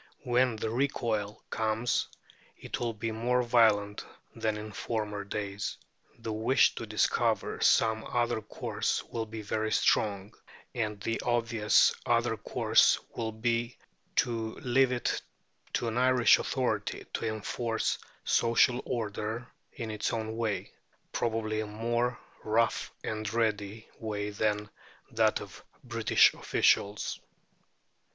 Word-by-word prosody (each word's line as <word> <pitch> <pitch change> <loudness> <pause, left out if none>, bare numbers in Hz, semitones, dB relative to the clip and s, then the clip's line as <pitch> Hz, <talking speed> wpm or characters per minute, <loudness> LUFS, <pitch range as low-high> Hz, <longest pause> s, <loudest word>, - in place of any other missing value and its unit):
When 125 -2 +2
the 110 0 -3
recoil 115 -5 -1
comes, 110 +1 0 0.5
it - - -5
will 115 -2 -2
be 115 +1 -3
more 125 +3 +1
violent 110 -4 +3 0.3
than 110 -1 -1
in 105 0 -7
former 105 -1 -3
days. 100 0 -4 0.4
The 115 -1 -4
wish 115 +5 +3
to - - -6
discover - - +1
some 110 0 +4
other 120 -2 0
course - - -2
will 115 -1 -4
be 110 0 -7
very 110 +1 -1
strong, 100 0 +1 0.4
and 105 -3 -2
the 115 +2 -2
obvious 115 -3 +3
other 115 -1 +2
course - - +3 0.2
will 115 -1 -2
be 115 +2 -1 0.4
to 115 -2 0
leave 130 +1 +2
it 125 -1 -1 0.5
to 120 - 0
an 115 +2 -1
Irish 130 -1 +5
authority - - -1
to 115 - -2
enforce 110 +1 -1 0.2
social 120 +2 +3
order 110 0 -3 0.3
in 115 -4 -5
its 105 - -1
own 110 -1 -3
way 110 -3 -2 0.4
probably 110 -2 -1
a 110 - -2
more 120 +3 -1 0.3
rough 115 +2 +1
and 110 -1 -3
ready 110 -1 -1
way 105 -2 -3
than 105 0 0 0.4
that - - +2
of - - -11 0.2
British - - +4
officials. 100 +1 +1
110 Hz, 125 wpm, -30 LUFS, 105-120 Hz, 0.5 s, Irish